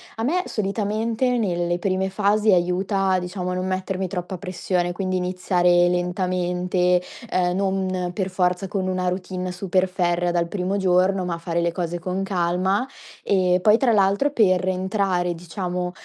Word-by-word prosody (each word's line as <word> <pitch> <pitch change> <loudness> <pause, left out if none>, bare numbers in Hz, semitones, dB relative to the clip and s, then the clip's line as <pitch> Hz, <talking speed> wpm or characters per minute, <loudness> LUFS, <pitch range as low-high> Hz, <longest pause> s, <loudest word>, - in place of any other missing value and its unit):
A 225 - -4
me 360 +8 +1
solitamente 220 +4 -1
nelle 175 -4 0
prime 190 +1 -1
fasi 210 +1 +2
aiuta, 185 +2 +1
diciamo 180 0 -4
a - - -2
non 185 +1 -2
mettermi 190 0 -2
troppa 180 +1 -5
pressione, 180 -1 -2
quindi 185 0 -2
iniziare 180 -1 +2
lentamente, 180 0 0 0.3
ehm, 180 -1 +1
non 190 -2 -1
per 190 0 -2
forza 180 +1 0
con 190 -1 -2
una 185 -1 0
routine 185 0 -4
super 185 0 0
ferrea 175 -1 0
dal 170 -1 0
primo 190 +2 -2
giorno, 185 0 +2
ma 170 -1 -2
fare 170 0 -2
le 170 0 0
cose 175 -1 -3
con 185 +2 -3
calma. 190 +5 0 0.4
E 185 -2 +3
poi 215 +2 +5
tra 250 -2 +2
l'altro 205 +7 +3
per 185 -7 +3
entrare 185 -1 0
diciamo, 180 +1 -4
185 Hz, 155 wpm, -23 LUFS, 180-195 Hz, 0.4 s, poi